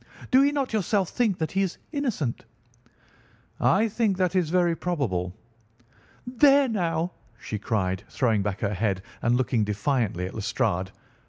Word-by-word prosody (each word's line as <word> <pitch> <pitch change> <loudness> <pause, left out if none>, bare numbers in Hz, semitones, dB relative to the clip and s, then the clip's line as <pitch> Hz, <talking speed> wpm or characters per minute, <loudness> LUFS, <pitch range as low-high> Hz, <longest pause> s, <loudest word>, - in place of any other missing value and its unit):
Do 265 +1 +6
you 285 - +3
not 275 -4 -2
yourself 200 -2 +1
think 220 -7 +1
that 160 -3 -2
he 195 - +1
is 190 -3 -1
innocent?" 245 - -2 1.2
"I 215 +4 +3
think 215 -3 0
that 185 0 +1
it - - +5
is 170 -4 -1
very 175 -1 +2
probable." 115 - -2 0.9
"There, 275 +2 +5
now!" 175 -6 -1 0.3
she 105 - -5
cried, 95 -4 -1
throwing 115 -6 +1
back 100 0 -3
her 105 -1 0
head 95 -1 -1 0.2
and 120 +1 +2
looking 125 -3 +1
defiantly 105 -2 -1
at 95 - -6
Lestrade. 100 -3 -1
160 Hz, 155 wpm, -26 LUFS, -, 1.2 s, Do